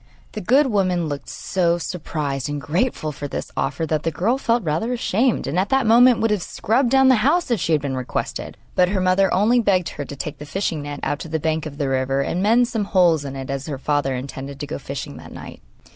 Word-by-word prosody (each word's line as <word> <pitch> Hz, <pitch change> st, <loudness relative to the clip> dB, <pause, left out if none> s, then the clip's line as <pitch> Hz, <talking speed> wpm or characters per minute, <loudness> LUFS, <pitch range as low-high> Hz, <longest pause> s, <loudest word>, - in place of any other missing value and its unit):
The -, -, -5 dB
good 265 Hz, +10 st, +4 dB
woman 185 Hz, -7 st, +1 dB
looked 145 Hz, -1 st, -5 dB
so 175 Hz, -3 st, 0 dB
surprised 150 Hz, -5 st, -3 dB
and 145 Hz, 0 st, -3 dB
grateful 155 Hz, -, -1 dB
for 145 Hz, 0 st, -6 dB
this -, -, -5 dB
offer 145 Hz, +4 st, -1 dB
that 155 Hz, -1 st, -1 dB
the 165 Hz, -, 0 dB
girl 220 Hz, -, 0 dB
felt 235 Hz, -3 st, +1 dB
rather 165 Hz, +9 st, -1 dB
ashamed, 240 Hz, 0 st, +1 dB
and 160 Hz, +6 st, -1 dB
at 195 Hz, -, 0 dB
that 270 Hz, -2 st, +2 dB
moment 240 Hz, +2 st, +6 dB
would 225 Hz, -1 st, +2 dB
have 210 Hz, -3 st, +1 dB
scrubbed 235 Hz, +8 st, 0 dB
down 265 Hz, +1 st, +5 dB
the 255 Hz, -, +6 dB
house 300 Hz, +4 st, +2 dB
if 235 Hz, -, +2 dB
she 170 Hz, -1 st, 0 dB
had 150 Hz, -2 st, +1 dB
been 135 Hz, -2 st, -2 dB
requested; 130 Hz, -1 st, -4 dB, 0.2 s
but 180 Hz, -1 st, +3 dB
her 195 Hz, 0 st, 0 dB
mother 185 Hz, +1 st, +3 dB
only 220 Hz, +6 st, +3 dB
begged 185 Hz, -6 st, +2 dB
her 145 Hz, -, -6 dB
to 140 Hz, -, -8 dB
take 145 Hz, +1 st, -6 dB
the 150 Hz, -, -7 dB
fishing 165 Hz, -2 st, -2 dB
net 145 Hz, 0 st, -6 dB
out 145 Hz, -, -1 dB
to 160 Hz, -, -7 dB
the 160 Hz, 0 st, -1 dB
bank 160 Hz, 0 st, -1 dB
of 145 Hz, -2 st, -10 dB
the 145 Hz, -2 st, -1 dB
river 135 Hz, +1 st, 0 dB
and 170 Hz, +6 st, -1 dB
mend 230 Hz, +4 st, +4 dB
some 220 Hz, -3 st, -2 dB
holes 175 Hz, -6 st, +3 dB
in 135 Hz, -1 st, -6 dB
it, 135 Hz, 0 st, -5 dB
as 140 Hz, +1 st, -4 dB
her 145 Hz, -3 st, -4 dB
father 140 Hz, -1 st, 0 dB
intended 135 Hz, +1 st, -7 dB
to 145 Hz, -, -4 dB
go 150 Hz, -, -5 dB
fishing 140 Hz, -1 st, -6 dB
that -, -, -12 dB
night. -, -, -10 dB
170 Hz, 245 wpm, -22 LUFS, 145-215 Hz, 0.2 s, moment